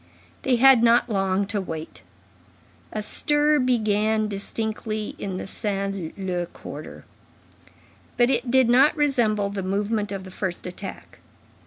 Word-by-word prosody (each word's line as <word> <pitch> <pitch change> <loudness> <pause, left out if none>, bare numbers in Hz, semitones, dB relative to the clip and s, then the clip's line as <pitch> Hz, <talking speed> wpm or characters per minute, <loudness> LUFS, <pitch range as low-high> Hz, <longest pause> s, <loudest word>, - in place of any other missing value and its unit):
They 260 - +2
had 260 0 +6
not 235 +1 +4
long 195 -1 +1
to 205 0 -2
wait. 160 -3 -7 0.9
A 215 - -3
stir 295 +6 +3
began 215 -3 +1
distinctly 215 +1 -4
in 190 -2 -4
the - - -5
Saint 195 -4 -3
Leu 180 -3 -2
quarter, - - -10 1.1
but 245 +1 +4
it 245 -1 0
did 260 0 +4
not 265 +6 +5
resemble 225 -9 +1
the 200 -1 -3
movement 205 +2 -1
of 195 -1 -5
the 185 - -10
first 185 -2 -4
attack. 185 +2 -8
210 Hz, 135 wpm, -24 LUFS, 195-240 Hz, 1.1 s, had